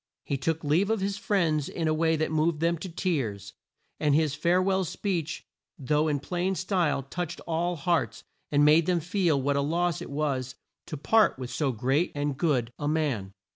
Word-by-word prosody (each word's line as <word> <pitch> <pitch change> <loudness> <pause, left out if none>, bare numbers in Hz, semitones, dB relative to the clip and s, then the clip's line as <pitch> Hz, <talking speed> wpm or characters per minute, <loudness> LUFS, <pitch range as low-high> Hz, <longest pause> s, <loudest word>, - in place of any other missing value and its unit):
He 140 - -1
took 160 +4 -2
leave 165 +8 +2
of 225 -1 +1
his 195 +1 -2
friends 165 -9 +1
in 165 -2 -2
a 155 - +2
way 160 +1 +2
that 155 0 -1
moved 155 0 +1
them 170 +1 +2
to 185 - -6
tears; 130 - -2 0.5
and 150 -2 +2
his 155 -2 +2
fare 170 +5 +2
well 190 0 +1
speech, 170 -2 -3 0.3
though 150 +3 +1
in 145 -2 0
plain 180 +5 -2
style, 180 -7 0
touched 175 +5 -5
all 170 +2 -1
hearts 165 - -1 0.3
and 145 0 +4
made 155 +2 +5
them 180 -2 +2
feel 170 -3 +1
what 140 +1 0
a - - +2
loss 170 +3 0
it - - -7
was 135 -3 -2 0.3
to 155 - -5
part 220 +7 +3
with 130 -1 -6
so 135 +3 0
great 135 +8 0
and 145 -1 -1
good 130 -6 0
a 145 - -2
man. 135 -11 -1
155 Hz, 195 wpm, -27 LUFS, 140-175 Hz, 0.5 s, made